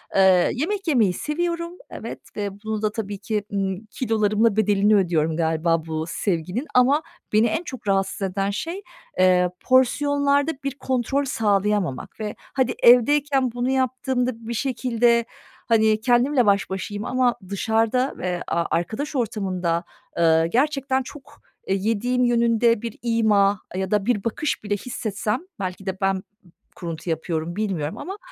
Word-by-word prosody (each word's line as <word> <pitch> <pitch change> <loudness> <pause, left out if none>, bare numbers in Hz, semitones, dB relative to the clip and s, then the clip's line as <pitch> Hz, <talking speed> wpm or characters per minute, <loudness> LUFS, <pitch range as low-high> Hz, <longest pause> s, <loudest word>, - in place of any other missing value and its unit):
Eee, 190 -2 +5
yemek 385 +7 -2
yemeyi 225 - +3
seviyorum, 335 - -2 0.2
evet. - - -7 0.2
Ve 205 -1 -2
bunu 220 -1 -3
da 215 -1 0
tabii 205 -2 -4
ki, 210 +1 -2
ımm, 195 +1 -2
kilolarımla 215 -1 +1
bedelini 210 0 +3
ödüyorum 165 -4 +1
galiba 165 0 +1
bu 160 -1 -3
sevginin. 180 - -2
Ama 270 +5 +5 0.3
beni 220 +2 +5
en 320 +11 -1
çok 260 -9 -8
rahatsız 195 0 0
eden 195 +1 -1
şey, 335 - -4 0.4
eee, 180 -1 +4
porsiyonlarda 285 +3 +3
bir 275 -1 -3
kontrol 260 +2 0
sağlayamamak 205 - 0
ve 210 -1 -4 0.2
hadi 260 -3 +1
evdeyken 265 +2 +5
bunu 245 +2 -2
yaptığımda, 260 -1 0 0.2
bir 235 - -3
şekilde, 235 -2 +1 0.4
hani, 220 -1 +3
kendimle 245 +2 +3
baş 200 -1 +2
başayım 205 +2 -4
ama 250 -1 +2
dışarıda 225 +5 +1
ve 180 -1 -3
a 170 0 0
arkadaş 220 - -2
ortamında, 185 -7 -1 0.4
ııı, 165 -1 +4
gerçekten 270 - +1
çok, 285 +2 -13 0.3
eee, 190 - +2
yediğim 230 +5 0
yönünde 235 -1 +3
bir 230 -2 -6
ima 210 -4 +3 0.2
ya 190 +1 -2
da 210 -1 +1
bir 220 -5 +1
bakış 230 +2 -2
bile 205 0 -1
hissetsem, 215 0 -3 0.2
belki 185 0 -5
de 190 -1 -3
ben 195 0 +2
b - - -7 0.5
kuruntu 170 -1 -6
yapıyorum, 160 +1 -2
bilmiyorum 185 -8 -2
ama 385 +3 -6
220 Hz, 145 wpm, -23 LUFS, 195-255 Hz, 0.5 s, Eee